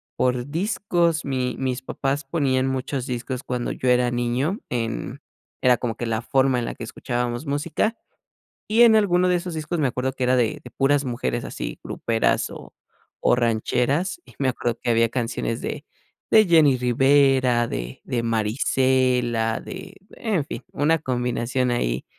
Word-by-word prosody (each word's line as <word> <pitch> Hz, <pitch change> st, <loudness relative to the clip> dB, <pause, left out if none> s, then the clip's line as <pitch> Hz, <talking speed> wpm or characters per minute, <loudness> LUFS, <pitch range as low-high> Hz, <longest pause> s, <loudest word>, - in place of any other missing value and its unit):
por 125 Hz, -1 st, 0 dB
discos, 170 Hz, -2 st, 0 dB
mi 130 Hz, -2 st, -1 dB
mis 130 Hz, -1 st, -2 dB
papás 135 Hz, +2 st, -2 dB
ponían 135 Hz, -3 st, +1 dB
muchos 130 Hz, 0 st, -2 dB
discos, 125 Hz, +1 st, -4 dB
cuando 125 Hz, -1 st, -3 dB
yo 130 Hz, -, -1 dB
era 125 Hz, 0 st, +3 dB
niño 125 Hz, -, -1 dB
en 120 Hz, +3 st, -3 dB, 0.4 s
Era 125 Hz, -2 st, +5 dB
como 115 Hz, -3 st, -3 dB
que 120 Hz, -, -3 dB
la 110 Hz, 0 st, -1 dB
forma 130 Hz, 0 st, +2 dB
en 120 Hz, -, -2 dB
la -, -, -5 dB
que 115 Hz, -, -8 dB
escuchábamos 120 Hz, +3 st, -3 dB
música. 165 Hz, +10 st, -1 dB, 0.7 s
Y 225 Hz, +3 st, +5 dB
en 230 Hz, -2 st, +7 dB
alguno 180 Hz, -3 st, +3 dB
de 180 Hz, -, +3 dB
esos 175 Hz, -1 st, -4 dB
discos 155 Hz, +2 st, -3 dB
me 140 Hz, -, +2 dB
acuerdo 130 Hz, +1 st, -2 dB
que 130 Hz, -1 st, -3 dB
era 130 Hz, +1 st, +3 dB
de 125 Hz, +5 st, 0 dB
de -, -, -11 dB
puras 140 Hz, +1 st, +2 dB
mujeres 120 Hz, -1 st, -2 dB
así, -, -, -6 dB
gruperas, 115 Hz, -1 st, 0 dB
o -, -, -11 dB, 0.5 s
o -, -, +6 dB
rancheras, 125 Hz, -, 0 dB
y -, -, -17 dB
me 135 Hz, -2 st, +1 dB
acuerdo 120 Hz, -2 st, -1 dB
que 120 Hz, -, -1 dB
había 115 Hz, 0 st, +3 dB
canciones 115 Hz, -1 st, -2 dB
de -, -, -4 dB, 0.5 s
de 215 Hz, -2 st, +6 dB
Jenny 155 Hz, -6 st, +5 dB
Rivera, 130 Hz, -1 st, +3 dB
de -, -, -5 dB
de 120 Hz, -2 st, -2 dB
Marisela, 120 Hz, +1 st, +1 dB
de 190 Hz, 0 st, -9 dB, 0.2 s
en 205 Hz, -10 st, -1 dB
fin, 130 Hz, -3 st, -7 dB
una 160 Hz, +3 st, +2 dB
combinación, 125 Hz, -1 st, -1 dB
ahí 65 Hz, -, -1 dB
130 Hz, 165 wpm, -23 LUFS, 120-145 Hz, 0.7 s, en